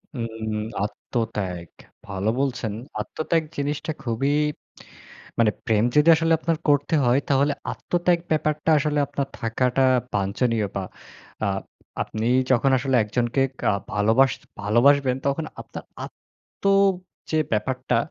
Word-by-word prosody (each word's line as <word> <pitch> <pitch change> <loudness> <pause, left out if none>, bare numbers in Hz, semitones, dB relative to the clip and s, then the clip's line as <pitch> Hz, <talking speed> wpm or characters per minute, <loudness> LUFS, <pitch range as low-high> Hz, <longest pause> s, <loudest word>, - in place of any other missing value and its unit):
হুম, 120 -3 -2 0.3
হুম, - - -2 0.3
আত্মত্যাগ। 100 -6 -3 0.4
ভালো 100 +1 -2
বলছেন। 125 -6 -1 0.3
আত্মত্যাগ 160 +1 -1
জিনিসটা 145 +3 -2
খুবই 130 +4 0 1.1
মানে 110 -2 +4
প্রেম 110 -2 +2
যদি 150 +2 +5
আসলে 165 0 +2
আপনার 165 0 0
করতে 145 +2 +3
হয়, 120 +2 +4
তাহলে 140 +1 +3 0.2
আত্মত্যাগ 175 0 0
ব্যাপারটা 155 0 0
আসলে 150 0 0
আপনার 140 0 -3
থাকাটা 125 +3 +1 0.3
বাঞ্ছনীয়। 105 +3 0
বা 95 - -1 0.6
আ - - +1 0.6
আপনি 110 +1 -3 0.2
যখন 130 +2 +3
আসলে 130 0 0
একজনকে 120 +4 0 0.2
কা - - +2 0.2
ভালোবাস 110 +5 +4 0.3
ভালোবাসবেন, 130 +5 +4
তখন 145 +3 -1 0.2
আপনার - - -9 0.2
আত্ম - - -21 0.7
যে 155 - +2
ব্যাপারটা 130 +5 0
130 Hz, 120 wpm, -24 LUFS, 110-145 Hz, 1.1 s, যদি